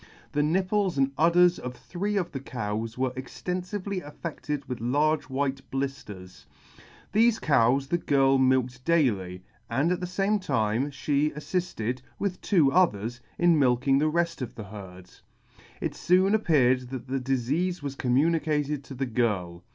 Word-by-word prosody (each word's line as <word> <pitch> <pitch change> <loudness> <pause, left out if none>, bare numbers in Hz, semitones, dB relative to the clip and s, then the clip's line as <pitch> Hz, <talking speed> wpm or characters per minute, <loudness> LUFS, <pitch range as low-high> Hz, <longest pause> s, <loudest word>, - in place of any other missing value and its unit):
The 145 - +1
nipples 185 +3 +1
and 135 0 +2
udders 175 +3 +4
of 125 0 -6
three 200 +8 -3
of 175 -3 -1
the 135 - -4
cows 115 -3 -4
were 130 0 0
extenfively 180 +8 -4
affedted 150 -2 -6
with 125 -3 -5
large 145 +5 +1
white 135 0 -1
blifters. 135 -9 -6 0.7
Thefe 225 +1 +4
cows 135 -1 +3
the 175 +5 -1
girl 135 -3 +3
milked 130 -1 +1
daily, 100 - +1 0.3
and 140 +9 +1
at 180 - 0
the 180 - -4
fame 195 +3 0
time 125 - 0
fhe 145 +1 0
aflifted, 150 - -2 0.2
with 195 -3 -3
two 160 -9 +3
others, 120 - +1 0.2
in 175 -3 +4
milking 135 +1 +3
the 155 +1 +2
reft 170 -1 -1
of 125 - -5
the 110 - -7
herd. 95 -3 -10 0.7
It - - -2
foon 185 +3 +3
appeared 130 - +3
that 130 -2 -6
the 135 +1 -1
difeafe 140 +7 -1
was 140 -1 -4
commu 135 +6 +2
nicated 150 -3 -1
to 135 - -9
the 135 +1 -1
girl. 100 -8 -1
140 Hz, 155 wpm, -27 LUFS, 125-170 Hz, 0.7 s, udders